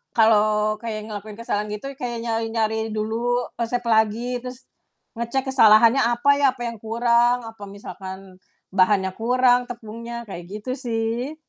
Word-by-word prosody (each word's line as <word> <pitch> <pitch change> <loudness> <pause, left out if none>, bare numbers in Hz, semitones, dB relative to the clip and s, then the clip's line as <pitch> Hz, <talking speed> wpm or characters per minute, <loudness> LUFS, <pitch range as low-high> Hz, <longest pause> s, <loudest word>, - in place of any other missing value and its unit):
kalau 215 -1 +3
kayak 215 -2 -5
ngelakuin 210 0 -7
kesalahan 210 -2 -2
gitu 210 +6 -5
kayak 240 -2 -4
nyari-nyari 225 -1 -1
dulu 235 +3 -1
resep 240 +1 -1
lagi 230 +2 +1
terus 250 +1 -9 0.6
ngecek 265 +3 -1
kesalahannya 230 0 +6
apa 240 +3 +2
ya, 285 - +3
apa 245 - -7
yang 230 - -11
kurang, 235 +2 +2
apa 225 -2 -10
misalkan 190 -1 -9 0.3
bahannya 190 0 +3
kurang, 245 +3 +2
tepungnya, 235 0 -7
kayak 175 -6 -9 0.2
gitu 255 - -3
sih. 235 +3 -2
230 Hz, 135 wpm, -23 LUFS, 215-245 Hz, 0.6 s, kesalahannya